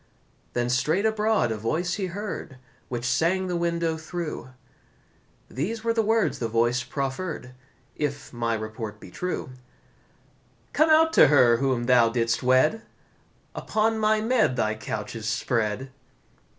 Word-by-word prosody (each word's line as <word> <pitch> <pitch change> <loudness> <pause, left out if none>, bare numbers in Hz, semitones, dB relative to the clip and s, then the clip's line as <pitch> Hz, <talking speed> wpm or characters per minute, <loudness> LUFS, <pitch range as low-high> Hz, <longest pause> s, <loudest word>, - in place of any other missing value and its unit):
Then 120 0 0
straight 155 - +1
abroad 220 - +1
a 110 - -2
voice 160 - -1
he 195 -3 -2
heard, 185 -7 -6 0.3
Which 120 -1 -4
sang 180 +8 +1
the 180 -1 -2
window 170 -1 0
through; 160 -5 -5 1.0
These 215 - -4
were 230 0 +1
the 225 - +2
words 220 -6 +1
the 115 - -1
voice 120 +2 +1
proffer'd 135 +1 -4 0.4
If 145 -3 -4
my 115 -1 -1
report 110 -1 -6
be 95 - -12
true: 180 - -4 1.2
"Come 310 +1 +3
out 320 +1 +5
to - - +7
her 125 -5 +5
whom 130 -2 0
thou 120 -2 +4
didst 115 0 0
wed! 130 - +3 0.7
Upon 220 +1 0
my 215 0 +2
mead 220 - +2
thy 110 -3 0
couch 110 0 -5
is 110 -1 -3
spread." 115 +2 -1
140 Hz, 140 wpm, -25 LUFS, 120-190 Hz, 1.2 s, to